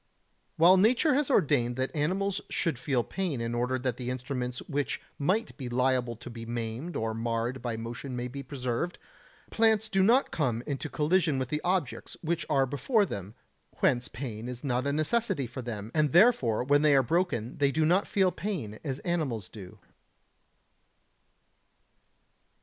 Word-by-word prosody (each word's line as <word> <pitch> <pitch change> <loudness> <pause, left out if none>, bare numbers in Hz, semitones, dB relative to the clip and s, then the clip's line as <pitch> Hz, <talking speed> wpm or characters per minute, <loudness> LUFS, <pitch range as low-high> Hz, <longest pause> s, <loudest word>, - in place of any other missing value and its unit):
While 175 +4 +7
nature 245 - +4
has 285 +1 +1
ordained 135 - +2
that 130 +3 -2
animals 190 +6 0
should 160 -8 -1
feel 130 -2 0
pain 180 -6 -3
in 115 0 -2
order 125 +2 0
that 130 -2 -2
the 125 -1 -4
instruments 125 -1 -3
which 145 -1 -2 0.2
might 190 +10 0
be 130 -4 -5
liable 125 -1 +1
to 120 +2 -10
be 115 -1 -8
maimed 120 +7 -4
or 110 0 -1
marred 115 +2 -2
by 120 -2 -3
motion 120 +3 -6
may 125 0 -3
be 140 +3 -6
preserved, 135 +4 -3 0.5
plants 220 -1 +3
do 195 -2 +2
not 235 +8 +4
come 130 -9 -1
into 145 +1 -3
collision 155 -1 +2
with 130 -1 -2
the 150 0 -1
objects 180 -7 -1
which 170 +1 -1
are 135 -1 +3
before 200 - +1
them; 100 - -6 0.4
whence 125 -2 +2
pain 115 -1 -6
is 125 -1 -7
not 130 -1 0
a - - +1
necessity 155 - 0
for 130 +2 -7
them, 110 -3 -6
and 150 -3 +2
therefore 170 - +5
when 145 +2 +3
they 150 -2 +5
are 135 - +5
broken 130 -6 -1
they 140 -1 +3
do 155 +2 +1
not 180 +5 +3
feel 190 -2 +2
pain, 145 - -4
as 135 -4 -3
animals 135 - -2
do. 105 -1 -11
135 Hz, 165 wpm, -29 LUFS, 120-175 Hz, 0.5 s, While